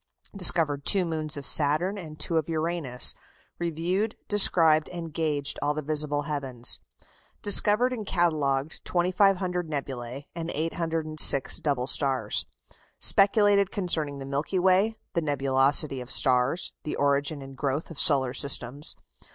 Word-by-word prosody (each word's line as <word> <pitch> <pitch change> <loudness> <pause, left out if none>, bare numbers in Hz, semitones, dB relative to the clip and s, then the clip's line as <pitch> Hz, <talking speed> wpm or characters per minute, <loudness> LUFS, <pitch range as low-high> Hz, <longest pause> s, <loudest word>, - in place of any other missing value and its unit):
Discovered 160 -6 +1
two 190 +3 +2
moons 155 -2 -3
of 140 - -8
Saturn 155 +8 +2
and 155 -4 -11
two 165 +2 -2
of 160 0 -2
Uranus. 160 -6 +3 0.5
Reviewed, 175 +6 -3
described, 165 -6 +3
and 165 -3 -8
gauged 150 -3 -2
all 145 +1 -1
the 155 - -5
visible 150 0 0
heavens. 135 -5 -1 0.6
Discovered 210 +5 +4
and 225 -4 -6
catalogued 155 -6 -2
2,500 180 -1 -1
nebulæ 135 -2 -6
and 165 -1 -6
806 160 -3 +3
double 140 -6 -2
stars. 130 -4 -1 0.5
Speculated 200 -1 +4
concerning 160 -8 -1
the 135 - -8
Milky 140 +7 -3
Way, 190 +4 +1 0.2
the 170 - -1
nebulosity 135 -1 +2
of 125 - -10
stars, 130 +8 +1
the 150 - -5
origin 140 +1 -1
and 135 0 -12
growth 140 +4 -4
of 160 - -8
solar 130 -4 +2
systems. 140 0 -1
155 Hz, 130 wpm, -25 LUFS, 140-175 Hz, 0.6 s, Discovered